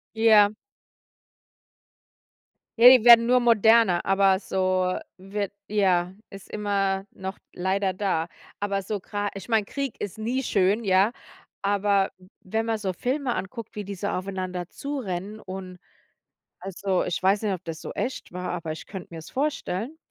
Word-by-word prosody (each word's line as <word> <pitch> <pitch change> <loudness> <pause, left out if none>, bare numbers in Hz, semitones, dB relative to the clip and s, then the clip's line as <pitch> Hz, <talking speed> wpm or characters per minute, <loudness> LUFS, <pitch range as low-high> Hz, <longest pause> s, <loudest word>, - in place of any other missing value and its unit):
Ja. 215 -2 +6 2.3
Ja, 240 +2 +10
die 250 -3 +7
werden 235 -1 +9
nur 250 +1 +5
moderner, 225 -5 +4
aber 195 -1 +4
so 185 -2 0 0.2
wird 195 +1 -4 0.2
ja, 185 -3 +1 0.2
ist 195 -1 -11
immer 195 -2 -1
noch 190 +1 -7 0.2
leider 190 +1 0
da. 185 -4 -1 0.3
Aber 200 -1 -1
so 200 +2 -3
gra 205 +2 -3
ich 195 +3 -9
meine, 220 -3 +2
Krieg 275 0 -4
ist 205 - -5
nie 240 +5 -2
schön, 205 -1 +2
ja, 195 +2 +3 0.5
aber 200 -1 +1
w 185 0 -19 0.2
wenn 220 +4 -1
man 225 -1 0
so 190 -3 -3
Filme 255 - -1
anguckt, 225 +3 -6
wie 210 - -4
die 200 - -6
so 195 +2 -4
aufeinander 185 -1 -4
zu 285 0 -5
rennen 195 0 -5
und 185 -2 -8 0.8
also, 195 -1 -1
ich 175 - -2
weiß 195 +3 +2
nicht, 205 -2 +1
ob 185 -1 -6
das 165 -3 -6
so - - -7
echt 260 - -4
war, 180 0 -4
aber 165 -2 -4
ich 155 - -7
könnte 190 -3 -8
mir's 160 -1 -9
vorstellen. 275 - -2
195 Hz, 160 wpm, -25 LUFS, 185-220 Hz, 2.3 s, Ja